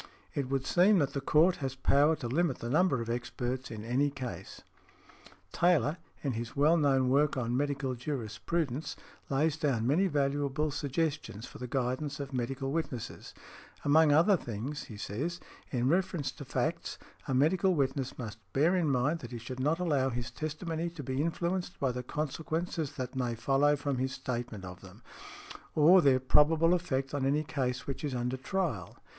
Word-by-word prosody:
It 140 -3 -2
would 135 -1 -1
seem 190 +7 +5
that 145 -5 +1
the 140 - -2
court 160 +6 +4
has 135 -2 -3
power 145 +4 +4
to 120 - -5
limit 150 +2 +1
the 120 - -5
number 155 -4 +3
of - - -10
experts 120 +2 -3
in 110 -1 -7
any 130 +5 +2
case. 125 -10 -7 0.9
Taylor, 170 -3 +3 0.3
in 140 - 0
his 115 0 -5
well 150 +4 +5
known 135 -5 +3
work 140 +2 +3
on 120 -1 -1
"Medical 140 -1 -1
Jurisprudence," 130 +4 -3 0.3
lays 150 +3 +1
down 135 -8 0
many 160 +10 +3
valuable 145 -1 0
suggestions 145 -5 -2
for - - -11
the 125 - -5
guidance 135 +3 -2
of 140 -1 -5
medical 135 +2 -2
witnesses; 140 -7 -4 0.5
among 150 +1 +5
other 170 +7 +5
things, 125 - -5
he 110 - -10
says, 145 - -3 0.3
"In 125 -1 0
reference 170 -3 +1
to - - -10
facts, - - -2 0.3
a 135 - 0
medical 175 +7 +3
witness 135 -2 -1
must 110 -3 -6
bear 160 +7 +3
in 170 -5 +2
mind 140 +5 +1
that - - -8
he 120 - -6
should 125 +3 -7
not 150 +5 +2
allow 145 -7 +1
his 120 0 -4
testimony 160 +4 -3
to 165 -4 -8
be 130 +2 -1
influenced 175 +3 -2
by 135 -2 +1
the 125 +1 -4
consequences 155 +3 -3
that 130 +1 -5
may 125 -2 -1
follow 135 +5 +3
from 140 -2 -2
his 130 0 -1
statement 120 -7 -4
of 90 -1 -9
them, - - -14 0.7
or 170 +5 +7
there 135 -4 +4
probable 155 +6 +4
effect 135 -7 -1
on 145 -2 -1
any 145 +3 +2
case 130 -4 -2
which 135 - -5
is 140 -3 -2
under 125 +1 -1
trial. 135 - -2
140 Hz, 175 wpm, -31 LUFS, 125-155 Hz, 0.9 s, or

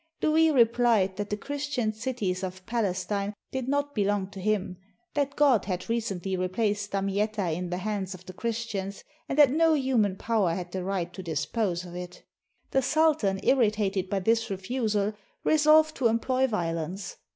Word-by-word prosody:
Louis 320 +1 +4
replied 235 -7 +3
that 205 0 -3
the 210 - -1
Christian 280 -3 -2
cities 215 -5 -2
of 185 0 -6
Palestine 200 -2 -1 0.2
did 260 -1 -3
not 285 +1 0
belong 200 -2 0
to 195 - -9
him; 195 -3 -1 0.4
that 280 -1 -1
God 275 -7 +4
had 185 +2 -3
recently 195 -5 -2
replaced 205 +3 -1
Damietta 200 -1 -1
in 180 +1 -4
the 180 - -2
hands 195 -1 -3
of 185 0 -15
the 185 - -9
Christians, 215 -2 -4 0.3
and 270 - -2
that 290 -4 +7
no 320 +2 +4
human 250 -9 +1
power 200 -5 +1
had 180 -1 -5
the 185 0 -3
right 180 -2 -2
to 190 - -7
dispose 180 +3 -2
of 175 - -10
it. 180 0 -8 0.5
The 270 - +3
sultan, 295 -10 +2
irritated 210 -6 +2
by 195 -1 0
this 225 +3 +1
refusal, 210 +1 -1 0.3
resolved 310 0 +5
to 250 - +3
employ 255 +4 +1
violence. 175 -3 -3
210 Hz, 160 wpm, -27 LUFS, 185-245 Hz, 0.5 s, that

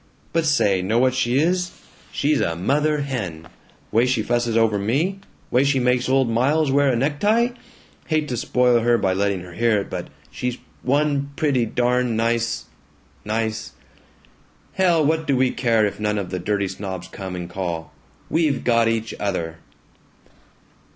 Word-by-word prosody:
But 165 -1 +1
say, 100 -11 +3
know 100 +5 0
what 130 +1 +3
she 130 -1 +1
is? 180 +4 0 0.3
She's 145 0 +1
a 85 - 0
mother 150 - +1
hen! 95 - -4 0.4
Way 115 +3 +3
she 125 -4 +1
fusses 120 -1 0
over 110 -2 +3
me 150 - 0 0.3
way 125 +2 +4
she 140 -1 +2
makes 125 0 +1
old 135 -1 +3
Miles 135 +6 +2
wear 140 0 +3
a - - +1
necktie! 205 - +2 0.6
Hate 155 -2 0
to 125 - -1
spoil 125 0 +2
her 120 +1 +3
by 95 -4 +1
letting 100 -1 0
her 90 -1 -11
hear 115 +2 +2
it, - - -9
but - - -4 0.2
she's 125 0 -3 0.2
one 140 +1 +1
pretty 140 -7 +1
darn 125 0 +1
nice 115 -1 0 0.6
nice 110 0 -2 1.0
Hell! 175 -5 +3
What 160 +1 0
do 135 - +2
we 130 0 +3
care 115 -3 +2
if 100 - -3
none 105 0 0
of 95 -3 -4
the 90 - -2
dirty 100 +2 -1
snobs 95 -1 -6
come 95 -1 -7
and 90 -1 -5
call? 85 -3 -4 0.3
We've 155 -5 +1
got 115 -1 +3
each 115 0 -1
other." 85 -5 -3
120 Hz, 165 wpm, -22 LUFS, 105-140 Hz, 1.0 s, way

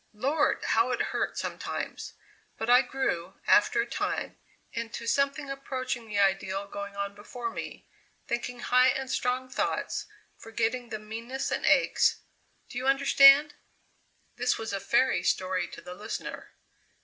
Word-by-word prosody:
Lord! 280 +7 +1
how 230 +3 +2
it 250 - -1
hurt - - -1
sometimes; - - -5 0.4
but 225 +2 0
I 250 +1 +8
grew, 265 -11 -2
after 425 -1 +4
a - - -2
time, - - -3 0.3
into 230 0 -5
something 280 +3 +1
approaching 260 -3 -4
the 210 -1 -4
ideal 195 0 +1
going 200 0 -7
on 200 0 -3
before 230 +3 -6
me, - - -7 0.4
thinking 240 0 -3
high 250 +1 +4
and 265 0 0
strong 250 +1 -1
thoughts, 255 - -2 0.3
forgetting 230 +2 -2
the 220 - -3
meannesses 230 +5 -5
and - - -1
aches - - +3 0.5
do 245 - -5
you 260 - -3
understand?" 275 +2 +7 0.8
This 250 +1 +1
was 225 -2 -5
a 200 - -1
fairy 240 -2 +2
story 185 0 0
to - - -11
the 180 - -9
listener. 205 +4 -6
240 Hz, 145 wpm, -28 LUFS, 210-265 Hz, 0.8 s, I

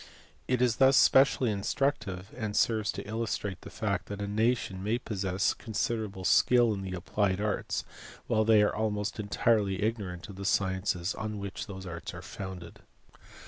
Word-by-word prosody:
It 125 -1 +2
is 120 -3 +2
thus 135 0 +6
specially 130 -3 +5
instructive, 100 -3 -2
and 110 -4 -4
serves 110 -2 +2
to - - -7
illustrate 105 -3 -3
the - - -9
fact - - -2
that 100 -1 -6
a 100 - -2
nation 105 -3 0
may 110 +4 +1
possess 95 -5 -1
consider 115 0 -2
able 95 -2 -8
skill 120 +3 +5
in 100 - -4
the 95 -1 -4
applied 95 +2 0
arts 105 0 -2 0.4
while 110 - +2
they 110 -1 +5
are 105 - +1
almost 105 -1 -2
entirely 100 -1 +1
ignorant 100 -6 -3
of 100 -3 -10
the 100 - -6
sciences 95 -1 0
on 110 -1 -4
which 100 -1 -5
those 95 -2 -8
arts 85 -2 -6
are - - -8
founded. 95 -3 -8
105 Hz, 170 wpm, -29 LUFS, 95-110 Hz, 0.4 s, thus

